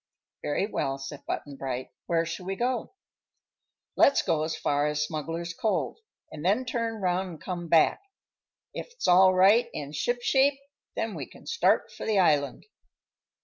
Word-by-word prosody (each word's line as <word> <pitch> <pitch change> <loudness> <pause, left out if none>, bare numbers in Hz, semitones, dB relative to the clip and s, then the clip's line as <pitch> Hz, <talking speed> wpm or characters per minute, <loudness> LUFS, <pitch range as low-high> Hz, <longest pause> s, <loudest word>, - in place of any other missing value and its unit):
"Very 145 +6 0
well," 135 -9 -2
said 135 +1 -8
Button 140 -2 -4
Bright. 130 -1 -4 0.2
"Where 165 -1 +1
shall 165 +3 -6
we 195 - -2
go?" 245 - -2 1.0
"Let's 280 - +5
go 160 -2 +1
as 155 0 -2
far 145 -1 +1
as 150 0 0
Smuggler's 165 +2 -4
Cove, 215 +5 -1 0.3
an' 155 - -8
then 205 +10 +1
turn 230 -2 -2
'round 185 +1 0
an' - - -9
come 175 +1 -5
back. 165 - +4 0.7
If - - -7
all's 185 +1 +6
right 210 +6 +5
an' 145 -1 -5
shipshape, 245 - +2 0.4
then 225 -1 -2
we - - -6
can - - -16
start 465 - +2
for - - -7
the 215 -2 +2
island." 145 -7 +2
175 Hz, 155 wpm, -27 LUFS, 150-225 Hz, 1.0 s, all's